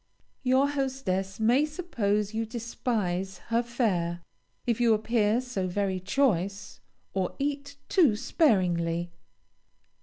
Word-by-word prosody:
Your 260 +2 +3
hostess 265 -10 -2
may 240 +6 +4
suppose 225 - -1
you 225 +1 0
despise 215 -5 -2 0.2
her 230 - +4
fare, 185 -8 -1 0.4
if 235 -1 0
you 230 -2 +5
appear 220 0 +2
so 245 -8 -3
very 190 0 -1
choice, 200 -2 0 0.3
or 190 -2 -1
eat 285 0 -3
too 310 - +4
sparingly. 175 - +1
220 Hz, 110 wpm, -28 LUFS, 190-260 Hz, 0.4 s, you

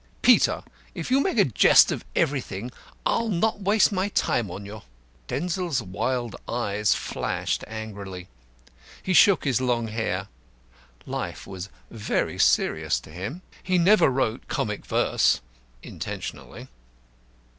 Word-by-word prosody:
"Peter, - - +5 0.3
if 165 - -5
you 265 - +5
make 320 0 0
a 200 - +6
jest 120 - +6
of - - -3
everything, 125 -5 -1 0.3
I'll 230 0 +1
not 205 +2 0
waste 205 +3 +3
my 190 0 0
time 115 - 0
on 95 +3 -7
you." 105 +1 -9 0.5
Denzil's 175 -2 -1
wild 120 +5 -2
eyes 105 -3 0
flashed - - -2
angrily. 100 -4 -7 0.8
He 185 - 0
shook 185 +3 +6
his 130 -3 +1
long 120 -3 0
hair. 110 +1 -2 0.8
Life - - -5
was 95 0 -7 0.2
very 110 -2 -2
serious 80 +1 +2
to - - -14
him. 100 - -6 0.2
He 185 -1 +1
never 190 +2 +5
wrote 130 -4 -1
comic - - -3
verse - - +2 0.4
intentionally. - - -7
125 Hz, 125 wpm, -25 LUFS, -, 0.8 s, a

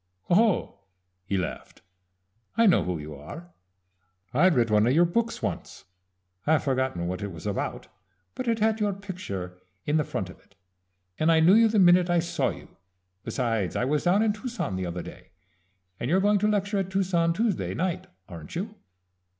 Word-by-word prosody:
"Oh," 200 - +2 0.5
he 100 0 -1
laughed, 90 -3 -5 0.7
"I 230 - +5
know 195 - +5
who 90 -1 -2
you 75 0 -8
are. 145 - -10 0.8
I 175 +9 +5
read 120 -9 +2
one 105 +1 +4
of 125 - +3
your 170 +4 +5
books 230 +7 -1
once. - - -5 0.6
I've 155 0 +3
forgotten 130 -10 -1
what 90 +3 -4
it 100 -1 -4
was 85 -3 -10
about; - - -3 0.5
but 255 - -5
it 230 -1 +2
had 220 0 +1
your 205 -1 +1
picture 100 - -7 0.3
in 150 +2 +2
the 155 - +2
front 95 -8 -4
of - - -17
it, 100 - -29 0.6
and 160 +2 +3
I 160 - +5
knew 165 +4 +6
you 225 +1 +6
the 215 0 0
minute 180 -1 +5
I 175 - +3
saw 170 +1 0
you. - - -10 0.5
Besides 115 -7 -1
I 125 - 0
was 150 +4 0
down 190 +5 +4
in 215 -2 +2
Tucson 215 - -4
the 95 -1 -3
other 85 0 -5
day, - - -12 0.7
and 120 - -3
you're 185 +4 +3
going 205 +1 +3
to 210 - +2
lecture 205 -1 0
at 190 -1 -2
Tucson 185 -3 +1
Tuesday 210 +2 -1
night, 185 +1 -2 0.2
aren't 80 -3 -10
you?" 205 +5 -4
170 Hz, 185 wpm, -26 LUFS, -, 0.8 s, knew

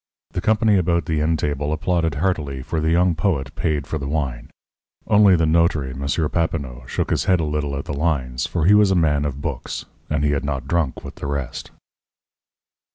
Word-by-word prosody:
The - - -3
company 110 -1 +3
about 85 -1 +1
the 80 -2 0
inn 80 +2 +1
table 75 0 -2
applauded 80 0 0
heartily, 75 -6 -1
for 80 +3 -2
the 80 - +1
young 90 +2 +3
poet 80 -6 -1
paid 75 -3 -1
for 80 - -3
the 70 - -4
wine. 70 -5 -3 0.6
Only 105 -2 +6
the 80 -1 +2
notary, 80 -4 +2
M. 65 +2 -6 0.3
Papineau, 70 -7 -2
shook - - -2
his - - +1
head 95 -2 +3
a - - 0
little 75 -2 -2
at 70 - -5
the - - -4
lines, 70 -5 -1
for 85 -3 -1
he 100 - +6
was 105 -1 +5
a 95 - +2
man 75 -4 +2
of 70 -1 -4
books, - - -4 0.2
and 75 -1 0
he 75 - +2
had 70 - -1
not 70 -3 -3
drunk 85 -6 -1
with - - -9
the - - -3
rest. 70 -4 -4
75 Hz, 205 wpm, -22 LUFS, 70-85 Hz, 0.6 s, Only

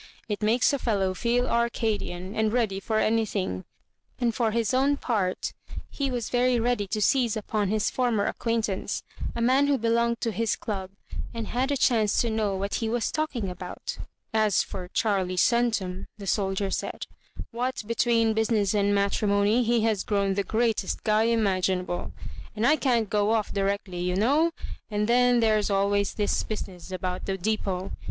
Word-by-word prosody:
It 210 0 -3
makes 230 +6 +3
a 280 - 0
fellow 195 -6 0
feel 240 +5 +1
Arcadian, 220 -5 -1
and 220 -1 +1
ready 220 -5 0
for 220 +2 -1
anything; 215 - 0 0.3
" - - -42
and 235 -2 +1
for 230 0 +1
his 225 0 0
own 275 +2 +3
part 205 -9 -1 0.4
he 275 -1 -2
was 245 -3 -3
very 245 0 +3
ready 230 -3 0
to 215 +2 -2
seize 240 -3 +2
upon 210 -1 -1
his 215 +2 0
former 240 -5 +1
ac - - -1
quaintance, 225 -4 -1 0.3
a 235 - -2
man 260 +4 +4
who 285 -1 +3
belonged 235 0 +1
to 230 - 0
his 225 0 0
club, 190 -3 -4 0.5
and 230 -1 -4
had 255 +3 0
a 285 - +1
chance 220 -5 +2
to 235 - 0
know 215 -3 0
what 200 +1 -3
he 225 - 0
was 235 -1 0
talking 305 -9 -2
about 180 0 -6 0.2
" - - -48
As 200 - +2
for 180 -2 -7
Charlie 190 -2 0
Centum," 220 -5 +1
the 200 - -8
soldier 195 0 0
said, - - -3 0.3
" - - -10
what 250 +2 -2
l^tween 230 -1 +2
business 220 -2 +1
and 205 -1 +2
matrimony, 200 +2 +2
he 235 0 +2
has 215 -3 +1
grown 200 -2 +1
the 200 +1 0
greatest 220 -2 0
guy 215 +1 +3
imaginable; 190 -5 0 0.4
and 220 +2 0
I 300 - +5
can't 245 -7 +1
go 210 +1 +1
off 220 -2 0
directly, 195 -2 -1
you 180 +1 -1
know; 280 - +3 0.4
and 210 0 0
then 245 0 +4
there's 215 -2 +2
always 200 0 +1
this 205 -1 +1
business 190 -4 -6
about 185 0 -4
the 195 -1 -1
dep6t. 195 -2 -2
215 Hz, 175 wpm, -26 LUFS, 200-235 Hz, 0.5 s, I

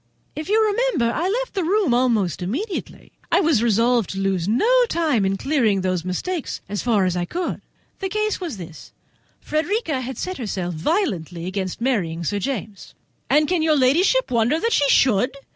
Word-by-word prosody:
If 310 +3 -6
you 430 +2 +4
remember, 405 - +1
I 350 +3 0
left - - -2
the 385 - -1
room 380 - +2
almost 230 - +1
immediately. 310 - -4 0.2
I - - +5
was 315 - +3
resolved 235 0 +2
to 195 - -4
lose 190 -3 0
no 235 - +2 0.2
time 305 -11 +1
in 195 0 -1
clearing 245 -6 +1
up 190 - -2
those 185 -2 -1
mistakes 290 - -3
as 205 +1 -3
far 215 -6 +2
as 180 -1 0
I 175 -1 -1
could. 350 - -4 0.4
The 385 - -3
case 425 0 -1
was 325 - -4
this—Frederica 305 - -5
had 260 +1 -6
set 370 -3 -4
herself 185 -6 -3
violently 175 - -1
against 190 +2 -4
marrying 180 -10 -1
Sir 205 +5 -1
James." 215 -3 -5 0.3
"And 300 0 +4
can 355 +1 +1
your 310 -1 +3
ladyship 340 - +3
wonder 235 +6 +2
that 460 +4 0
she 285 -7 +3
should?" 250 -1 +3
250 Hz, 175 wpm, -22 LUFS, -, 0.4 s, I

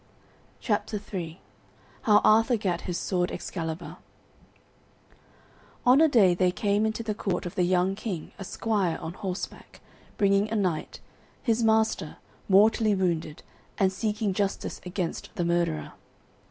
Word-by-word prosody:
CHAPTER 210 -1 -1
III 170 -2 -4 0.6
HOW 210 -2 +5
ARTHUR 225 +3 +5
GAT 180 -5 -1
HIS 175 - -1
SWORD 180 -2 0
EXCALIBUR 165 -1 -5 1.9
On 255 +4 +6
a 320 - +7
day 210 - +5
there 180 +1 +2
came 205 +3 +1
into 220 +1 -3
the 220 -1 -2
court 195 -2 -2
of 175 - -5
the - - 0
young 180 +1 +2
King 195 -5 -5
a - - -5
squire 195 -4 -1
on 160 - -6
horseback, 185 0 -6 0.4
bringing 200 +1 +3
a 225 - -2
knight, 180 -7 -2 0.4
his 230 -2 +1
master, 220 -7 +1 0.3
mortally 215 +2 +5
wounded, 170 -5 -1 0.3
and 190 -2 +2
seeking 210 0 -1
justice 195 0 -2
against 180 -2 -3
the 175 - -1
murderer. 170 -2 0
195 Hz, 135 wpm, -27 LUFS, 175-215 Hz, 1.9 s, a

